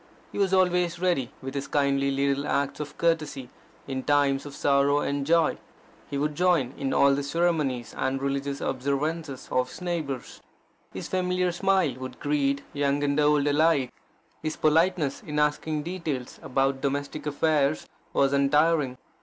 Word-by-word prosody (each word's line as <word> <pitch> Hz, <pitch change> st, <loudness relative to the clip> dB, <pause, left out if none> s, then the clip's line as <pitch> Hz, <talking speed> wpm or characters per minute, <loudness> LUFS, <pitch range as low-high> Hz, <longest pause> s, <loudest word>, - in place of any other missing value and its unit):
He -, -, -5 dB
was 195 Hz, -2 st, +2 dB
always 180 Hz, -2 st, +2 dB
ready 170 Hz, -8 st, 0 dB
with 135 Hz, 0 st, -5 dB
his 140 Hz, -1 st, -3 dB
kindly 140 Hz, -1 st, +1 dB
little 140 Hz, +1 st, 0 dB
acts 140 Hz, 0 st, -1 dB
of 150 Hz, -1 st, -6 dB
courtesy 155 Hz, -6 st, 0 dB, 0.4 s
in 130 Hz, -1 st, -3 dB
times 140 Hz, 0 st, +2 dB
of 140 Hz, -, -9 dB
sorrow 140 Hz, +1 st, +3 dB
and 140 Hz, 0 st, -2 dB
joy. 165 Hz, -1 st, +3 dB, 0.5 s
He 140 Hz, -, -3 dB
would 150 Hz, +2 st, 0 dB
join 165 Hz, -6 st, +2 dB
in 135 Hz, -1 st, -2 dB
all 140 Hz, 0 st, +5 dB
the 140 Hz, -, 0 dB
ceremonies 145 Hz, -6 st, 0 dB
and 130 Hz, +1 st, -1 dB
religious 140 Hz, 0 st, -2 dB
observances 140 Hz, +2 st, -2 dB
of 125 Hz, 0 st, +1 dB
his -, -, -10 dB
neighbours. 160 Hz, -8 st, -4 dB, 0.5 s
His -, -, -6 dB
familiar 180 Hz, -1 st, 0 dB
smile 190 Hz, -4 st, +2 dB
would 130 Hz, -1 st, -7 dB
greet 140 Hz, -1 st, 0 dB
young 145 Hz, 0 st, 0 dB
and 140 Hz, +1 st, +1 dB
old 150 Hz, -1 st, +3 dB
alike. 145 Hz, -3 st, +3 dB, 0.5 s
His 155 Hz, 0 st, -3 dB
politeness 160 Hz, -2 st, +2 dB
in 150 Hz, -1 st, -5 dB
asking 150 Hz, +1 st, 0 dB
details 160 Hz, -7 st, -4 dB
about 135 Hz, +1 st, 0 dB
domestic 145 Hz, +2 st, -3 dB
affairs 150 Hz, 0 st, +1 dB, 0.2 s
was 140 Hz, 0 st, +2 dB
untiring. 145 Hz, -1 st, +2 dB
145 Hz, 155 wpm, -26 LUFS, 140-160 Hz, 0.5 s, all